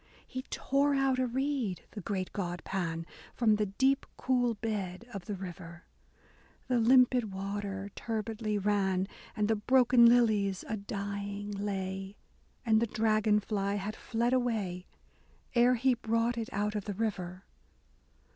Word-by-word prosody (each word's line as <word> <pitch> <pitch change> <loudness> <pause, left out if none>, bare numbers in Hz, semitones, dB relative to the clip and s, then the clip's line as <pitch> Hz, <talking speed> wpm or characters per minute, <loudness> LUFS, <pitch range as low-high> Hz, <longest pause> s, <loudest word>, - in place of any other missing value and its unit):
He 260 - -5
tore 280 +1 +1
out 270 -1 +2
a 255 - +2
reed, 255 -7 -1
the 210 - -7
great 185 0 -3
god 175 -3 -3
Pan, 165 -3 -2 0.3
From 220 -3 +3
the 210 -1 0
deep 265 +8 +1
cool 245 -2 +1
bed 205 -2 -3
of 195 -4 -6
the 205 - -3
river: 175 -2 -8 0.8
The 250 -2 +2
limpid 245 -1 +4
water 195 0 -4
turbidly 220 -1 -2
ran, 195 -2 +1 0.3
And 210 -1 +1
the 225 - +2
broken 245 +2 +5
lilies 215 -5 +3
a 220 - -1
dying 200 0 -4
lay, 195 -1 -4 0.5
And 220 -1 +4
the 235 - +2
dragon 215 -1 +2
fly 200 -1 -1
had 205 +2 -3
fled 235 +2 -1
away, 215 -8 -1 0.7
Ere 245 +1 +5
he 255 +2 +3
brought 230 0 0
it 230 -1 -4
out 210 +1 -1
of 210 -2 -3
the 205 - -4
river. 190 -4 -3
210 Hz, 145 wpm, -31 LUFS, 195-235 Hz, 0.8 s, broken